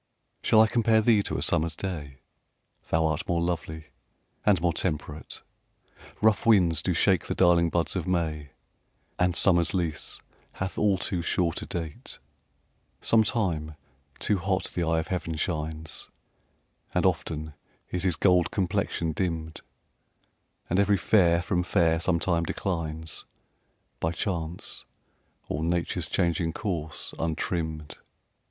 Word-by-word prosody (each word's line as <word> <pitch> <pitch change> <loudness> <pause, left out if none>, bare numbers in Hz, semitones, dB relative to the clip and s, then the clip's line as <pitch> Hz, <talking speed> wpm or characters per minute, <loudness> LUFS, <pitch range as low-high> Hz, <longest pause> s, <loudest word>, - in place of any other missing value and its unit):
Shall 110 - +5
I - - +7
compare 110 0 +3
thee 110 -1 +4
to - - -3
a - - 0
summer's 80 0 +1
day? 75 -9 -5 0.7
Thou 80 0 +2
art 80 -1 -1
more 85 - +1
lovely 80 -2 -3 0.5
and 100 -4 +4
more 85 0 +1
temperate: 75 -3 -3 0.8
Rough 110 -3 +4
winds 90 -8 +4
do 90 0 0
shake 95 0 +3
the - - -2
darling 85 -2 +4
buds 85 +1 0
of 90 -3 -2
May, 80 -5 -1 0.7
And 90 -1 +2
summer's 85 -2 +4
lease 80 -4 -2 0.3
hath 95 0 -4
all 100 -2 +3
too 90 -1 -1
short 85 0 0
a - - -7
date: 80 -4 -6 0.8
Sometime 95 -9 +1 0.4
too 105 -3 +1
hot 95 +1 -1
the 90 - -1
eye 80 0 +1
of 80 0 -2
heaven 85 -3 -2
shines, 80 -1 -3 0.9
And - - +2
often 80 -1 -1 0.4
is 90 - -1
his 90 -3 +2
gold 90 -2 +3
complexion 85 -3 -1
dimm'd, 80 -2 -3 1.1
And 90 - +1
every 100 0 +4
fair 85 -3 +3
from 90 -1 0
fair 80 -2 +2
sometime 85 -1 +1
declines, 80 -3 -3 0.7
By 80 +1 0
chance, 85 -2 -3 0.6
or 75 +2 -2
nature's 85 +1 -1
changing 85 -1 +1
course, 85 -7 -4
untrimm'd. 80 -1 -2
85 Hz, 130 wpm, -27 LUFS, 80-95 Hz, 1.1 s, I